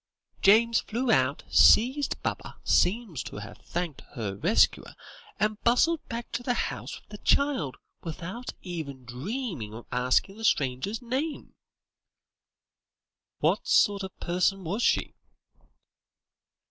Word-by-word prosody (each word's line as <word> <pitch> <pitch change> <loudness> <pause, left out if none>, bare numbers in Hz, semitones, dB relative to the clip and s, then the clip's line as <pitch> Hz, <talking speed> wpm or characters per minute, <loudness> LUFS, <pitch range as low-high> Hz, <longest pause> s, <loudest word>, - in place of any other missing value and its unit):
James 225 +3 +5
flew 235 +2 -1
out, 130 +2 +2
seized 265 +6 +5
Baba, - - -4
seems 190 - +1
to - - -8
have 105 0 -8
thanked 170 -5 -4
her 105 -5 -3
rescuer, 180 - +2 0.4
and 215 0 0
bustled 300 +8 +3
back 235 0 -6
to 230 - -2
the 245 0 -1
house - - -3
with - - -31
the 210 0 -9
child, 275 - +1 0.2
without 180 +9 -6
ever 165 -6 -4
dreaming 130 - -5
of 115 - -9
asking 125 +11 +1
the 225 - -9
stranger 135 -4 +1
her 245 - -17
name." 285 +5 -3 1.9
"What - - +1
sort 205 -3 +4
of 190 -1 -5
a - - -8
person 185 +2 +1
was 195 +8 -2
she?" - - +1
195 Hz, 130 wpm, -27 LUFS, 140-235 Hz, 1.9 s, James